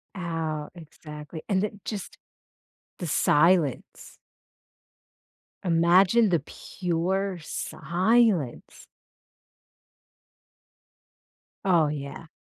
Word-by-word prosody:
Oh. 165 Hz, -4 st, -3 dB
Exactly. 155 Hz, -1 st, -10 dB
And 190 Hz, -1 st, +2 dB
then 205 Hz, -1 st, -4 dB
just 205 Hz, -4 st, -6 dB, 0.8 s
the 175 Hz, -, -4 dB
silence. 165 Hz, +1 st, +1 dB, 1.5 s
Imagine 180 Hz, +6 st, +4 dB
the 170 Hz, -3 st, +2 dB
pure 185 Hz, +4 st, -3 dB
silence. 175 Hz, -, 0 dB, 2.8 s
Oh, 170 Hz, -5 st, +4 dB
yeah. 145 Hz, +2 st, -6 dB
170 Hz, 65 wpm, -26 LUFS, 155-190 Hz, 2.8 s, Imagine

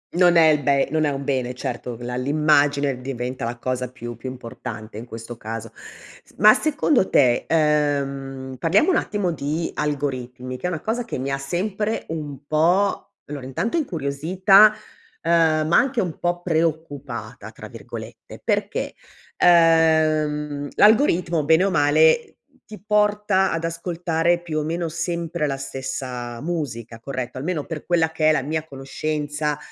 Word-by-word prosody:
Non 175 Hz, -1 st, +5 dB
è 160 Hz, -2 st, +7 dB
il 150 Hz, -1 st, +3 dB
be 140 Hz, 0 st, +2 dB
non 155 Hz, 0 st, +1 dB
è -, -, +2 dB
un 140 Hz, -1 st, -4 dB
bene 130 Hz, -3 st, -2 dB
certo 120 Hz, -1 st, -5 dB
la 125 Hz, +1 st, -5 dB
l'immagine 145 Hz, -1 st, +2 dB
diventa 125 Hz, -1 st, -4 dB
la 120 Hz, +1 st, -4 dB
cosa 125 Hz, 0 st, -3 dB
più 120 Hz, -1 st, -8 dB
più 130 Hz, +3 st, -7 dB
importante 115 Hz, -3 st, -8 dB
in 120 Hz, -, -8 dB
questo 115 Hz, 0 st, -9 dB
caso. 115 Hz, 0 st, -6 dB
S -, -, -16 dB
ma 215 Hz, +2 st, +8 dB
secondo 295 Hz, -7 st, +1 dB
te, 120 Hz, -2 st, +3 dB
ehm, 140 Hz, -4 st, 0 dB
parliamo 195 Hz, -, +3 dB
un -, -, +3 dB
attimo 205 Hz, -4 st, -1 dB
di 155 Hz, +2 st, -3 dB
algoritmi, 130 Hz, -4 st, -3 dB
che 155 Hz, -, -3 dB
è -, -, -1 dB
una 165 Hz, -4 st, -4 dB
cosa 230 Hz, +3 st, -2 dB
che 230 Hz, -, -5 dB
mi 135 Hz, +2 st, -3 dB
ha 135 Hz, -, -1 dB
sempre 200 Hz, +9 st, -2 dB
un 145 Hz, -4 st, -6 dB
po' 175 Hz, +6 st, +1 dB
allora 145 Hz, -2 st, -7 dB
intanto 135 Hz, -, -2 dB
incuriosita, 185 Hz, -, +4 dB, 0.5 s
ehm, 160 Hz, -2 st, +3 dB
ma 170 Hz, -, +4 dB
anche 260 Hz, -2 st, +2 dB
un 175 Hz, -4 st, -4 dB
po' 175 Hz, 0 st, -1 dB
"preoccupata" 160 Hz, -6 st, -3 dB
tra -, -, -10 dB
virgolette -, -, -10 dB
perché, -, -, -1 dB, 0.4 s
ehm, 155 Hz, -3 st, +3 dB
l'algoritmo 180 Hz, -, +4 dB
bene 160 Hz, +4 st, +4 dB
o 195 Hz, -, +1 dB
male 155 Hz, +6 st, +3 dB, 0.3 s
ti 215 Hz, -3 st, -10 dB
porta 210 Hz, -2 st, +2 dB
ad 165 Hz, 0 st, -2 dB
ascoltare 170 Hz, 0 st, 0 dB
più 155 Hz, -2 st, -2 dB
o -, -, -2 dB
meno 165 Hz, +2 st, -2 dB
sempre 170 Hz, -1 st, -2 dB
la 135 Hz, -1 st, -2 dB
stessa 130 Hz, -3 st, -5 dB
musica, 125 Hz, -9 st, -4 dB
corretto, 130 Hz, 0 st, -5 dB
almeno 155 Hz, +1 st, -3 dB
per 160 Hz, -2 st, -6 dB
quella 165 Hz, -2 st, +2 dB
che 155 Hz, -1 st, +2 dB
è -, -, +6 dB
la 155 Hz, -, +1 dB
mia 155 Hz, +2 st, -2 dB
conoscenza, 150 Hz, +1 st, -3 dB
155 Hz, 155 wpm, -22 LUFS, 135-170 Hz, 0.5 s, ma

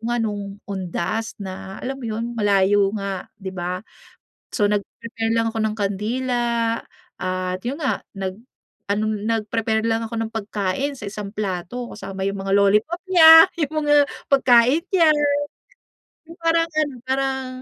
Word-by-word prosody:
nga 240 Hz, -, 0 dB
no'ng, 205 Hz, -2 st, -2 dB, 0.2 s
undas, 195 Hz, +3 st, -3 dB
na, 190 Hz, 0 st, -7 dB
alam 270 Hz, +1 st, -5 dB
mo 245 Hz, -, -8 dB
'yon, 220 Hz, +1 st, -3 dB
malayo 205 Hz, -2 st, +3 dB
nga, 195 Hz, -2 st, -4 dB
di 190 Hz, -1 st, -7 dB
ba? 180 Hz, 0 st, -3 dB, 0.8 s
So, -, -, +1 dB
nag-prepare 225 Hz, +2 st, -3 dB
lang 225 Hz, 0 st, +1 dB
ako 225 Hz, -, -4 dB
ng 215 Hz, -1 st, -1 dB
kandila, 230 Hz, +3 st, -1 dB, 0.4 s
at 185 Hz, 0 st, -2 dB
'yon 280 Hz, +5 st, -3 dB
nga, 270 Hz, -, 0 dB, 0.2 s
nag-ano, 200 Hz, +1 st, -5 dB, 0.2 s
nag-prepare 220 Hz, 0 st, 0 dB
lang 225 Hz, 0 st, 0 dB
ako 230 Hz, -, -6 dB
ng 225 Hz, -, -6 dB
pagkain 215 Hz, +5 st, -2 dB
sa 230 Hz, -, -11 dB
isang 205 Hz, 0 st, -7 dB
plato, 205 Hz, +4 st, -4 dB
kasama 195 Hz, -2 st, -6 dB
yung 195 Hz, 0 st, -2 dB
mga 195 Hz, 0 st, -2 dB
lollipop 210 Hz, -, +2 dB
niya, 325 Hz, -2 st, +10 dB, 0.2 s
yung 310 Hz, 0 st, -1 dB
mga, 290 Hz, -1 st, +5 dB, 0.2 s
pagkain 260 Hz, +3 st, +5 dB
niya. 335 Hz, -5 st, +4 dB, 1.2 s
Yung 335 Hz, +1 st, -13 dB
parang 330 Hz, 0 st, +2 dB
ano, 305 Hz, -3 st, 0 dB
parang 265 Hz, 0 st, -1 dB
225 Hz, 145 wpm, -22 LUFS, 195-260 Hz, 1.2 s, niya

